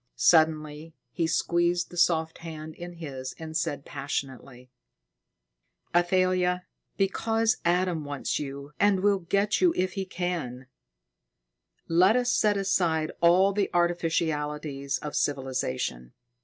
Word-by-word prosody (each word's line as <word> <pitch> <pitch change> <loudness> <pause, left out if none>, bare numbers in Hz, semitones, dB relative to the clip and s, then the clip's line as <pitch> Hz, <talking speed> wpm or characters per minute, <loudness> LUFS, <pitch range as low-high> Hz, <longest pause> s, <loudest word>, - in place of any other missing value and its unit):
Suddenly 155 -1 +2 0.2
he 165 -2 -1
squeezed 175 +1 +1
the - - -10
soft 165 -2 +1
hand 160 -1 -8
in 175 +2 -9
his 135 -6 -7
and 160 -1 -8
said 145 -3 -2
passionately: 135 -3 -6 1.2
"Athalia! 180 0 +2 0.3
Because 225 +3 +1
Adam 175 -2 +1
wants 145 -1 -3
you 140 0 -6
and 200 -2 +3
will 200 0 +3
get 200 +4 0
you 355 -2 +4
if 185 +1 0
he 195 -2 -3
can, 170 -9 -4 1.2
let 180 +6 +4
us 245 0 +2
set 210 -2 +2
aside 175 -5 +1
all 185 +4 +5
the 200 -1 0
artificialities 155 -5 -1
of 150 - -5
civilization. 125 - -2
170 Hz, 115 wpm, -27 LUFS, 150-185 Hz, 1.2 s, all